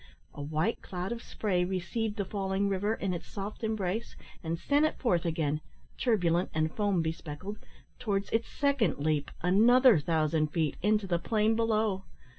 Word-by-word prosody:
A 145 - -7
white 155 +9 -1
cloud 180 +2 -5
of 235 -1 -4
spray 185 -7 -1
received 190 +4 -2
the 200 -3 -2
falling 195 0 -1
river 205 +3 0
in 195 -4 -2
its 175 0 -6
soft 205 +3 -6
embrace, 220 0 -2 0.3
and 165 0 -2
sent 285 - +2
it 310 - +1
forth 180 -9 +1
again 155 -2 0 0.3
turbulent 180 -7 +1
and 155 0 +1
foam 200 -5 +1
bespeckled 165 +5 -5 0.4
towards 200 -5 -1
its 225 +1 +1
second 275 - +1
leap, 145 0 0
another 230 - +6
thousand 155 0 +1
feet, 155 -1 -1
into 210 +1 +2
the 175 -2 0
plain 215 +3 +2
below. 215 -4 +1
195 Hz, 160 wpm, -30 LUFS, 165-220 Hz, 0.4 s, another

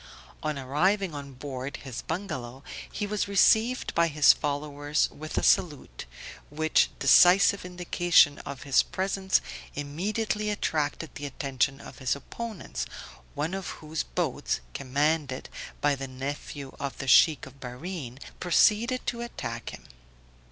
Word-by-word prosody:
On 155 -2 -2
arriving 175 +8 +1
on 140 -2 -8
board 130 0 -6
his 130 -3 -7
bungalow, 140 -8 -5 0.3
he 205 - -3
was 205 0 -1
received 220 +5 +3
by 170 0 +3
his 150 -2 +6
followers 145 0 -1
with 155 +1 -7
a - - +1
salute, 145 - +1 0.4
which 155 +2 +2
decisive 190 +2 +6
indication 175 -4 +3
of 140 -2 -7
his 140 -1 +4
presence 190 0 0 0.3
immediately 210 +9 -2
attracted 155 -6 -2
the 145 - -5
attention 135 0 -1
of - - -11
his 130 0 0
opponents, 220 +8 -6 0.5
one 155 +5 -2
of 195 -2 -4
whose 155 0 -4
boats, - - -2
commanded 140 0 -1 0.3
by 145 0 +3
the 135 -1 -4
nephew 135 +1 -6
of 140 -1 -4
the 135 - -5
Sheikh 150 +1 +6
of 140 - -14
Bahrene, 130 +1 -6 0.2
proceeded 220 +8 +3
to 235 -1 -2
attack 115 - -5
him. - - -10
150 Hz, 130 wpm, -27 LUFS, 140-185 Hz, 0.5 s, his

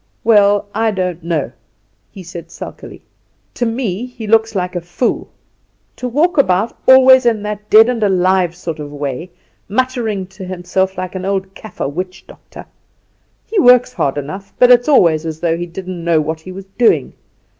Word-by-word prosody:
"Well, 205 -2 +4
I 225 +1 +1
don't 180 -4 -3
know," 160 -7 -2 0.6
he 195 -3 -11
said 170 -1 -9
sulkily; - - -10 0.5
"to 240 - -1
me 225 -1 -3
he 245 -3 -9
looks 225 +1 +2
like 180 -1 -2
a 175 - -2
fool. 175 +8 -2 0.7
To 250 - -4
walk 310 +6 +1
about 195 -3 +1
always 260 0 +7
in 220 -3 +1
that 210 0 -6
dead 220 +1 +7
and 245 -2 -2
alive 185 -3 +2
sort 165 -3 -6
of 145 -1 -7
way, 145 +3 -5 0.4
muttering 225 -4 -1
to 190 +1 -12
himself 185 +1 -2
like 185 0 -5
an 185 -1 -5
old 190 0 -2
Kaffer 215 - -6
witchdoctor! 180 +5 -8 0.8
He 440 - -1
works 250 -2 +5
hard 140 - -1
enough, 185 +8 -7
but 250 0 +6
it's 245 +3 +5
always 165 - +4
as 160 -1 -5
though 165 -1 0
he 175 +1 -5
didn't 180 0 -7
know 170 -2 +2
what 155 +1 -3
he 185 - -10
was 190 +1 -9
doing. 240 - +2
190 Hz, 170 wpm, -16 LUFS, 175-225 Hz, 0.8 s, always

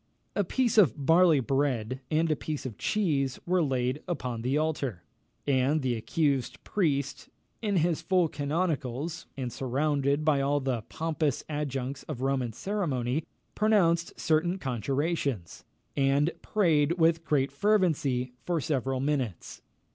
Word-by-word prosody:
A 205 - +2
piece 235 +3 +2
of 145 - +3
barley 165 -1 +6
bread 130 -2 0
and 160 +1 +2
a - - +3
piece 150 -1 -5
of 115 -6 -6
cheese 145 -11 0
were 180 +1 +2
laid 130 -1 0
upon 125 -9 -3
the 130 +5 0
altar, 145 - -1 0.4
and 140 +2 +2
the 125 -2 +1
accused 135 +3 -1
priest, 140 -7 -1 0.3
in 210 -3 0
his 170 -2 +2
full 180 -3 +2
canonicals, 150 0 -2
and 125 -3 -3
surrounded 140 +2 0
by 145 -3 +3
all 145 +1 +2
the 130 -4 -1
pompous 155 -4 -1
adjuncts 140 -3 -3
of 125 - -4
Roman 135 -3 0
ceremony, 150 - -2 0.3
pronounced 175 -6 +2
certain 170 +3 +1
conjurations, 135 - -2 0.3
and 140 +3 +2
prayed 165 -7 +2
with 165 -1 +2
great 140 -4 +1
fervency 140 -8 +1
for 175 -2 0
several 135 -3 -1
minutes. 135 - -2
145 Hz, 130 wpm, -28 LUFS, 130-165 Hz, 0.4 s, barley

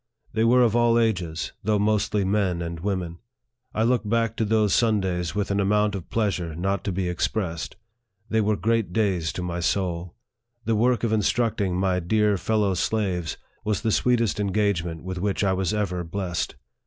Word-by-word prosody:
They 110 0 +1
were 125 +2 +5
of 115 -2 +2
all 120 -1 +4
ages, 90 -8 0
though 105 +1 +2
mostly 105 -1 +1
men 95 -3 +1
and 85 0 -5
women. 90 -2 -3 0.5
I 110 - 0
look 120 -1 +2
back 115 +1 0
to 110 - +1
those 105 -1 +2
Sundays 95 -8 +1
with 105 -1 -1
an 100 - +1
amount 105 +1 +2
of 95 -4 -6
pleasure 95 -7 -1
not 95 +2 -1
to 100 - 0
be 90 0 -1
expressed. 90 -1 -2 0.5
They 110 0 +1
were 105 0 +2
great 115 -5 0
days 95 -7 +1
to 90 - -4
my 85 -1 -3
soul. 90 -1 -1 0.5
The 115 - +1
work 120 +3 +2
of 115 -2 +1
instructing 105 -3 +1
my 95 -1 +1
dear 105 +4 +2
fellow 105 -2 +1
slaves 90 -3 -1 0.3
was 105 -1 -1
the 110 -1 0
sweetest 115 -2 +2
engagement 95 -5 0
with 95 0 -4
which 100 +1 -1
I 95 -1 +2
was 95 -2 0
ever 95 -4 -1
blessed. 90 -1 -3
100 Hz, 180 wpm, -25 LUFS, 90-110 Hz, 0.5 s, were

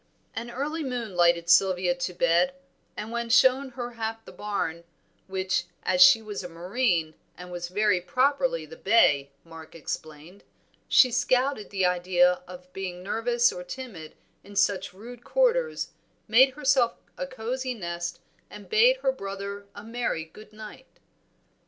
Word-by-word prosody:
An 235 +2 -5
early 295 +6 -3
moon 240 -7 -4
lighted 170 -1 +3
Sylvia 180 0 +4
to 175 +1 -4
bed, 170 +11 +2 0.4
and 215 - -5
when 235 0 -3
shown 260 +3 +4
her 245 -1 -5
half 225 -1 -5
the - - -11
barn, 185 -5 -3 0.4
which, 185 -2 -1 0.2
as 180 0 +1
she 185 +5 +8
was 210 -2 -6
a 180 - -7
Marine, 175 -1 -1 0.3
was 175 -1 -6
very 185 -1 +1
properly 285 - +1
the 480 - -12
bay, 145 - +3
Mark 165 -1 -13
explained, 160 +3 -7 0.4
she 255 - +6
scouted 250 -1 +1
the 190 -2 0
idea 180 0 +2
of 180 0 -12
being 180 -2 -6
nervous 235 +4 +1
or 180 - -7
timid 180 -8 -9 0.3
in 205 +1 -14
such 195 -1 +1
rude 235 +6 -12
quarters, - - +1 0.4
made 255 +4 +5
herself 265 -5 +2 0.2
a 275 - -4
cosy 255 0 -4
nest 170 -3 -5 0.3
and - - -12
bade 475 +3 +5
her 265 - +3
brother 200 -3 -7
a 205 - -9
merry 230 -8 -3
good 210 +6 -15
night. 215 +4 -12
205 Hz, 145 wpm, -26 LUFS, 180-250 Hz, 0.4 s, she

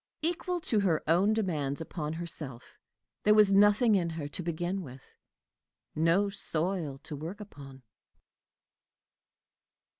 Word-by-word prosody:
Equal 350 +2 -1
to 220 -8 +1
her 180 -6 +1
own 180 +6 +4
demands 155 -11 -1
upon 160 -2 -4
herself, 155 -7 -7 0.4
there 210 0 +5
was 210 -2 +6
nothing 205 +3 +5
in 175 -4 +2
her 160 -3 -5
to 180 - -5
begin 175 +3 -2
with 130 -5 -10 0.9
no 165 +6 +3
soil 170 -5 -2
to 150 - -6
work 165 +8 -7
upon. 140 -10 -11
170 Hz, 120 wpm, -30 LUFS, 155-205 Hz, 0.9 s, was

